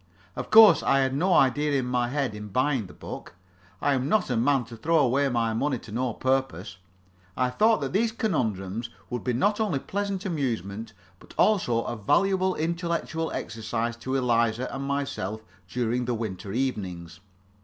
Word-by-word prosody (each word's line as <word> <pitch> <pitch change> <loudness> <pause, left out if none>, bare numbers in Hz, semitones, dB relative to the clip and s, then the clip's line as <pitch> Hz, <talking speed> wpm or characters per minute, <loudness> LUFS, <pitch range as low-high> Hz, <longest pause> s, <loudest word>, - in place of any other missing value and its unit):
Of - - -5
course 220 -1 +8
I 135 - +3
had 130 0 +1
an 140 +3 -2
idea 150 -5 +3
in 135 -3 +1
my 125 -1 0
head 135 -2 -1
in 105 0 -7
buying 130 +1 0
the - - -13
book; - - -9 0.4
I 145 - +2
am 130 +1 -1
not 215 - +3
the 125 - -2
man 130 +3 +2
to 115 0 -10
throw 160 +9 +1
away 140 0 +3
my 115 -2 0
money 135 +4 0
to 115 - -12
no 120 +1 -1
purpose. 130 -8 -1 0.6
I 125 -1 +1
thought 220 - +3
that 135 +2 -3
these 225 +3 +2
conundrums 115 - -2 0.2
would 125 - -3
be 125 - 0
not 205 - +1
only 210 -10 +1
a - - -2
pleasant 200 +3 -3
amusement, 115 - -3 0.3
but - - -16
also 125 - +3
a 120 - -4
valuable 190 - +2
intellectual 165 0 -2
exercise 115 +1 -3
to 130 +3 -3
Eliza 120 -1 +1
and 135 0 -4
myself 120 -7 -3 0.2
during 125 +2 -1
the 120 0 -1
winter 105 -3 -5
evenings. 95 -9 -3
130 Hz, 175 wpm, -26 LUFS, 115-150 Hz, 0.6 s, course